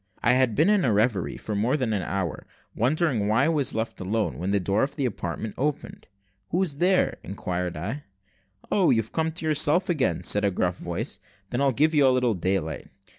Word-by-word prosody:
I 120 - +4
had 130 -4 +2
been 155 +5 +3
in 205 -2 +3
a 120 - +2
reverie 100 - +1
for 110 - -5
more 115 +8 +1
than 125 -6 -1
an 100 - 0
hour, 90 0 -3 0.3
wondering 130 - +1
why 115 +6 +3
I - - +2
was 150 -8 0
left 110 -2 -3
alone, 105 +3 -1
when 90 +3 -2
the 100 0 +2
door 100 +3 0
of 135 +1 -1
the 140 -3 -1
apartment 100 -1 -4
opened. 145 +2 -3 0.4
"Who 180 +3 +1
is 150 -7 -2
there?" 185 +1 +2
inquired 90 -2 -4
I. 110 - -5 0.7
"Oh! 190 -4 +3
you've 115 -1 +1
come 160 0 0
to 165 0 -4
yourself 155 +4 +2
again," 150 -7 0
said 105 - +3
a 100 - +3
gruff 90 -1 -1
voice; 85 -1 -4 0.3
"then 120 - -1
I'll 140 -1 +3
give 155 +5 +2
you 145 -3 +5
a - - +6
little 125 -2 +2
daylight." 90 -4 -2
120 Hz, 210 wpm, -25 LUFS, 100-150 Hz, 0.7 s, a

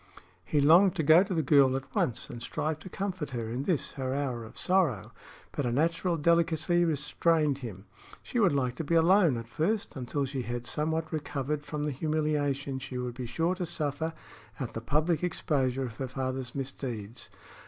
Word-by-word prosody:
He 150 - 0
longed 175 +7 +6
to 165 - 0
go 160 +4 +7
to 200 +1 -2
the 160 - +1
girl 135 -2 +5
at 135 0 -6
once 120 - 0
and 120 - -8
strive 155 +5 -2
to 185 - -10
comfort 185 -5 -3
her 120 -4 -4
in 125 +3 -2
this, 155 +1 -1
her 130 -1 -3
hour 130 -5 -2
of 110 - -12
sorrow; 140 - +1 0.4
but 145 - -2
a 120 - 0
natural 165 +5 +1
delicacy 170 +2 +2
restrained 150 -1 +1
him. 105 -6 -8 0.4
She 245 - -2
would 200 -5 +5
like 130 -3 0
to 165 - -2
be 170 +3 0
alone, 165 - +5
at 115 0 -6
first, 195 - -1
until 135 +2 -2
she 135 -1 -3
had 120 0 -4
somewhat 160 +4 -1
recovered 150 -1 -2
from 150 0 -4
the 150 - -1
humiliation 145 -2 -1
she 130 -1 -6
would 125 -1 -3
be 125 0 -6
sure 165 +9 0
to 180 -2 -3
suffer 155 +2 -2 0.5
at 130 - -4
the 115 - -4
public 155 +6 +1
exposure 135 -6 0
of 115 -3 -8
her 135 - -3
father's 130 -1 -4
misdeeds. 125 -4 -5
145 Hz, 190 wpm, -29 LUFS, 130-165 Hz, 0.5 s, go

